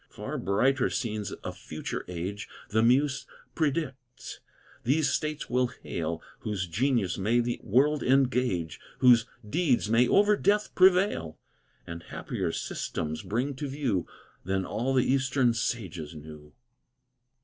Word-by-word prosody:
Far - - -5
brighter 130 +8 +2
scenes 110 -5 -3
a - - -3
future - - -6
age, 90 +4 -5 0.2
The 110 +1 +2
muse 135 +4 +2 0.3
predicts, 135 -5 -3 0.4
these 140 +3 +2
States 155 -1 -2
will 125 +1 +2
hail, 120 - -5 0.2
Whose 100 -3 -3
genius 105 +1 0
may 110 +5 +2
the 120 0 -1
world 140 +7 +3
engage, 125 - +1 0.2
Whose 120 -2 +6 0.2
deeds 130 -5 +1
may 120 +2 +5
over 205 +6 +5
death 205 +1 +1
prevail, 185 - +3 0.5
And 85 0 -7
happier - - -4
systems 80 +1 -3
bring 120 +8 -2
to 145 - -3
view 130 - -1 0.4
Than 95 0 -1
all 130 +7 -1
the 130 - +3
eastern 130 -2 +2
sages 90 -9 -3
knew. 75 -1 -11
120 Hz, 125 wpm, -28 LUFS, 100-135 Hz, 0.5 s, Whose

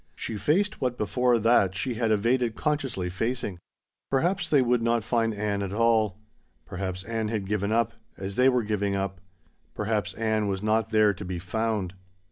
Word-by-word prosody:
She 110 - -4
faced 175 - +1
what 125 -2 -1
before 125 +3 +2
that 110 -4 +3
she 120 +6 -1
had 115 0 0
evaded 115 +2 +2
consciously 140 - -1
facing. 105 0 -3 0.5
Perhaps 175 +8 +1
they 145 - +5
would 120 -1 +2
not 115 -1 +1
find 115 0 +1
Ann 105 -1 -2
at 100 -1 -3
all. 110 -3 +2 0.5
Perhaps 95 0 -4
Ann 110 +1 -2
had 105 -3 -2
given 100 +1 -1
up 115 0 +2 0.2
as 95 +1 -5
they 130 +1 +5
were 125 -2 +2
giving 100 -2 -1
up. 95 -1 -3 0.5
Perhaps 105 0 -1
Ann 110 -2 0
was 95 0 -2
not 110 +1 +1
there 110 -2 +4
to 100 +2 -8
be 90 -1 -4
found. 100 +1 -2
110 Hz, 175 wpm, -27 LUFS, 100-120 Hz, 0.5 s, they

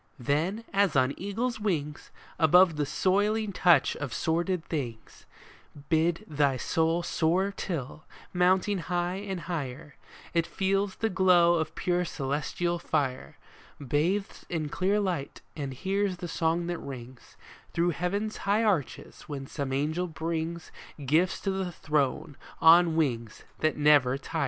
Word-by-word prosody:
Then, 155 - -1
as 195 -5 +2
on 130 +1 +3
eagles' 225 +5 -3
wings, 150 -8 -2 0.3
Above 170 +1 +6
the 150 -1 -1
soiling 205 +5 +1
touch 175 -6 +4
of 145 -4 -5
sordid 170 +1 -1
things, 120 -8 -6 0.6
Bid 165 +1 +1
thy 145 -3 +1
soul 165 +6 0
soar 175 +4 +1
till, 155 -3 -5 0.3
mounting 185 +2 +2
high 175 +1 -2
and 195 -3 -5
higher, 145 -4 -5 0.4
It 170 -1 +1
feels 195 0 0
the 225 - -1
glow 180 -2 +5
of 160 -2 -1
pure 180 -1 0
celestial 160 +3 -2
fire, 140 -6 -2 0.4
Bathes 160 +9 -1
in 155 -3 -2
clear 195 +7 +1
light, 180 -9 -3
and 140 -3 -4
hears 190 +6 -1
the 175 - -6
song 165 +1 0
that 175 0 -3
rings 125 -2 -10 0.3
Through 175 +1 +1
heaven's 200 +7 -2
high 205 +3 +1
arches 185 - -2
when 140 -2 -5
some 140 -1 -4
angel 155 +6 -1
brings 165 +1 -4 0.3
Gifts 160 +7 +2
to 195 - -1
the 190 -2 -2
Throne, 150 -3 -1 0.2
on 165 0 +6
wings 120 -9 -1 0.2
that 155 0 +1
never 145 -3 +4
tire 160 +3 -5
170 Hz, 135 wpm, -28 LUFS, 145-185 Hz, 0.6 s, Above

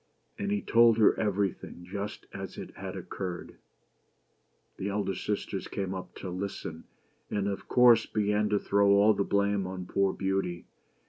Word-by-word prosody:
And 200 0 -2
he 205 - 0
told 115 -1 +5
her 110 - +6
everything 100 -4 -2
just 100 +3 -5
as - - -7
it - - -8
had - - -6
occurred. 90 -3 -6 1.2
The 100 - -3
elder 100 -1 -1
sisters 105 +1 -3
came 95 -1 -3
up 95 -1 -7
to 95 - -6
listen; 90 -3 -5 0.4
and 100 -1 -1
of 100 -1 -4
course 120 -2 +6
began 105 0 +1
to 105 - +2
throw 100 0 +2
all 105 +2 +6
the 100 - 0
blame 100 -1 +1
on 90 -1 -5
poor 100 +1 +1
Beauty. 95 -3 -2
100 Hz, 155 wpm, -29 LUFS, 95-105 Hz, 1.2 s, her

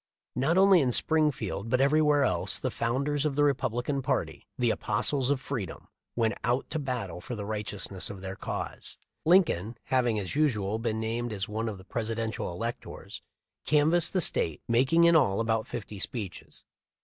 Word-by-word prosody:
Not 150 +8 +2
only 190 -2 +6
in 130 -3 +1
Springfield 130 -9 +1
but 130 - +2
everywhere 145 +1 +4
else 95 -4 +2
the 130 - -3
founders 140 +6 -1
of 150 -3 -1
the 145 - +3
Republican 135 -1 0
party 130 - -2
— - - -53
the - - +2
apostles 135 -3 0
of 145 -2 +2
freedom 120 - -6
— - - -59
went 115 -2 +1
out 120 +3 0
to 160 - -1
battle 120 - -4
for 120 - -6
the 105 -2 -5
righteousness 105 -3 -2
of 100 -2 -7
their 95 0 -6
cause. - - -6 0.3
Lincoln, 120 - +3
having 120 -4 +1
as 100 +3 -4
usual 110 -9 +1
been 115 -1 -2
named 115 +2 -2
as 100 -2 -3
one 110 +2 -2
of 105 - -6
the 95 - -14
Presidential 115 -2 -3
electors, 115 +7 -6 0.4
canvassed 155 +3 +3
the 185 - +2
State, 80 - 0
making 130 +8 +4
in 170 0 +6
all 100 -11 +3
about 110 -1 0
fifty 105 -4 -6
speeches. 100 -4 -5
120 Hz, 175 wpm, -28 LUFS, 105-145 Hz, 0.4 s, only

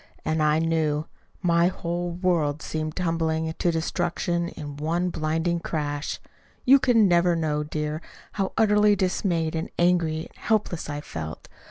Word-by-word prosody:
And 155 0 +1
I 150 0 +3
knew. 160 -2 +1 0.4
My 170 -1 +4
whole 175 -1 -2
world 170 -4 0
seemed 155 -1 -3
tumbling 160 -2 0
to 175 - 0
destruction 170 +1 -1
in 145 -4 -8
one 170 +4 0
blinding 165 +2 0
crash. 145 -3 -3 0.5
You 275 +2 +7
can 230 -5 +4
never 175 -1 +4
know, 155 -2 0
dear, 150 +1 -3 0.3
how 195 -2 -2
utterly 210 -1 +5
dismayed 180 -4 0
and 160 0 -3
angry 170 -3 +2
and - - -27
helpless 210 -8 -1
I 145 0 -3
felt. 80 - -7
165 Hz, 145 wpm, -25 LUFS, 155-175 Hz, 0.5 s, You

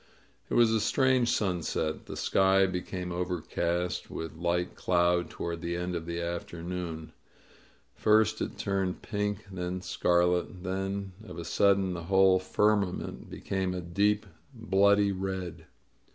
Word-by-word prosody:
It - - -1
was 120 -2 +5
a 110 - +2
strange 130 +1 +3
sunset. 85 -5 -1
The - - -6
sky 95 0 +4
became 90 0 -4
overcast 90 0 -2
with 80 - -5
light 85 +2 -1
cloud 85 -1 +2
toward 85 -1 -5
the 85 0 -2
end 90 +1 -3
of 85 -1 -4
the 85 0 -3
afternoon. 85 -1 -5 0.8
First 110 0 +3
it - - -3
turned 95 -2 -1
pink, 105 -1 -2
then 90 0 -3
scarlet, 90 0 +1
then 95 +1 -3
of - - -10
a 85 - -5
sudden 95 +2 +3
the 85 -1 -6
whole 95 0 +5
firmament 100 0 0
became 95 -1 -2
a 90 - -3
deep, 100 +4 +1 0.3
bloody 100 -2 +3
red. 95 -2 -4
90 Hz, 135 wpm, -29 LUFS, 85-100 Hz, 0.8 s, was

